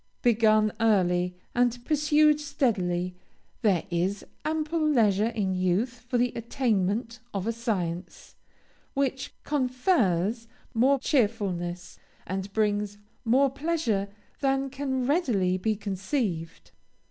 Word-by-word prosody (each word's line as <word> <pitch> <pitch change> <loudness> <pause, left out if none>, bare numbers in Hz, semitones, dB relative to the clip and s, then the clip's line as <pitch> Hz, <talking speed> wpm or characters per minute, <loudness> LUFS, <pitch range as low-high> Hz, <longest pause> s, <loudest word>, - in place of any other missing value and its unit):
Begun 215 -2 +4
early, 180 -5 +2 0.2
and 245 0 +1
pursued 300 0 +4
steadily, 185 -11 0 0.5
there 200 -8 +2
is 180 +4 -1 0.2
ample 315 +1 -1
leisure 220 -8 +3
in 210 -5 -1
youth 195 +8 0
for 250 - +1
the 245 +1 +2
attainment 230 -1 -1 0.2
of 195 -1 -2
a 230 - +1
science, 190 -7 -4 0.6
which 270 -1 -1
confers 245 - +1 0.3
more 260 +5 +4
cheerfulness, 200 - -1 0.3
and 190 +1 -4
brings 205 -1 0 0.3
more 260 +3 +3
pleasure 275 -9 -1 0.3
than 270 -1 0
can 265 -2 -2
readily 240 - +2
be 215 +4 0
conceived. 195 - -3
225 Hz, 105 wpm, -27 LUFS, 190-265 Hz, 0.6 s, Begun